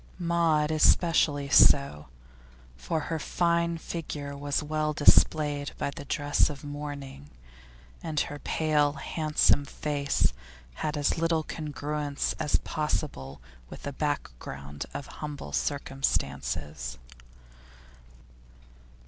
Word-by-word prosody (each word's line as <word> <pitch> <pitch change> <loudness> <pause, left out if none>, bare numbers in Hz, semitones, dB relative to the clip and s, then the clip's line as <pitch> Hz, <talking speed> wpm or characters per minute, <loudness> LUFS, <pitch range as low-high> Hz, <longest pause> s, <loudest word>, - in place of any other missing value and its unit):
Maud 170 -3 +2
especially 155 -2 +3
so, 140 - +5 0.7
for 65 - -2
her 160 +2 -3
fine 170 +1 +1
figure 150 -4 -5
was 145 +1 -1
well 155 0 -1
displayed 145 -1 +4
by 140 - -2
the 140 - -9
dress 145 +2 +2
of 145 -1 -8
mourning, 145 - -7 0.7
and 155 -2 -2
her 145 - -4
pale, 150 -2 +1
handsome 150 0 +2
face 140 - 0 0.5
had 150 0 -1
as 145 +3 +1
little 165 -1 +1
congruence 150 -2 -3
as 150 - 0
possible 75 - -3 0.3
with - - -10
a 140 - -4
background 70 - -4
of 140 - -6
humble 145 - -7
circumstances. 70 +2 -2
145 Hz, 100 wpm, -28 LUFS, 140-155 Hz, 0.7 s, so